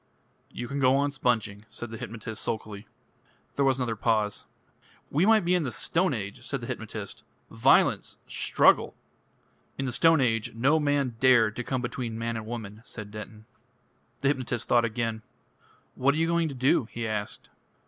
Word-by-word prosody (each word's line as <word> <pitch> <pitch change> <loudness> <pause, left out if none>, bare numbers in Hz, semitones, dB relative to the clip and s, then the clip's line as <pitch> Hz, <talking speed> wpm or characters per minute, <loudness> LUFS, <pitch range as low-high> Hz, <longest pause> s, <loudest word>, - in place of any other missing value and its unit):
"You 120 - -6
can 140 +2 -3
go 130 0 +4
on 140 +1 +1
sponging," 110 -6 -1
said 120 -1 -7
the 115 - -6
hypnotist 115 -2 -6
sulkily. 105 -2 -4 0.7
There 140 - +2
was 135 -1 +3
another 120 -3 -1
pause. 105 -2 0 0.6
"We 165 +8 +3
might 220 -4 +5
be 175 - +3
in 180 - +3
the 140 - -2
Stone 165 +6 +1
Age," 100 -2 -6
said - - -3
the - - -7
hypnotist. - - -6 0.3
"Violence! - - +3
Struggle!" - - +3 0.8
"In 135 - -2
the 130 - -2
Stone 165 +6 +4
Age 115 -2 0
no 135 +7 +3
man 145 -5 0
dared 115 -4 +5
to 125 - -2
come 130 0 -2
between 120 -2 -4
man 115 0 -2
and 110 -1 -5
woman," 110 -2 -6
said 110 -4 -8
Denton. 105 0 -9 0.8
The 140 - +3
hypnotist 130 -4 -2
thought 120 -1 +4
again. 115 -1 -2 0.7
"What 140 +2 +2
are - - -2
you 165 - +2
going 170 0 +1
to 140 - -6
do?" 130 -1 +3
he 115 +1 -5
asked. 105 -2 -4
120 Hz, 175 wpm, -27 LUFS, 110-140 Hz, 0.8 s, might